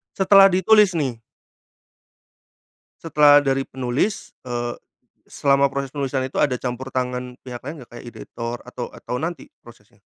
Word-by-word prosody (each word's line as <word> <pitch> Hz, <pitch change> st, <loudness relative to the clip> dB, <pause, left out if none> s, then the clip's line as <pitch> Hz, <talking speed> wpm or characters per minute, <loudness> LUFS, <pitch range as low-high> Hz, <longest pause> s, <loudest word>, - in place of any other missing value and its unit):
Setelah 195 Hz, 0 st, +7 dB
ditulis 195 Hz, +1 st, +4 dB
nih? 135 Hz, -8 st, -2 dB, 1.8 s
Setelah 145 Hz, -2 st, +5 dB
dari 135 Hz, -1 st, 0 dB
penulis, 130 Hz, -, -2 dB, 0.2 s
eee, 120 Hz, -1 st, -3 dB, 0.5 s
selama 140 Hz, -1 st, +2 dB
proses 140 Hz, 0 st, -3 dB
penulisan 135 Hz, -2 st, -2 dB
itu -, -, -11 dB
ada 130 Hz, -, +2 dB
campur 130 Hz, +1 st, -5 dB
tangan 125 Hz, -1 st, -3 dB
pihak 125 Hz, -2 st, -8 dB
lain 145 Hz, +1 st, -7 dB
nggak? 120 Hz, -, -17 dB
Kayak 120 Hz, -, -10 dB
editor 115 Hz, 0 st, -6 dB
atau 125 Hz, -1 st, -6 dB
atau 125 Hz, -, -6 dB
nanti 165 Hz, +3 st, -5 dB, 0.2 s
prosesnya? 110 Hz, -3 st, -18 dB
135 Hz, 135 wpm, -22 LUFS, 125-150 Hz, 1.8 s, Setelah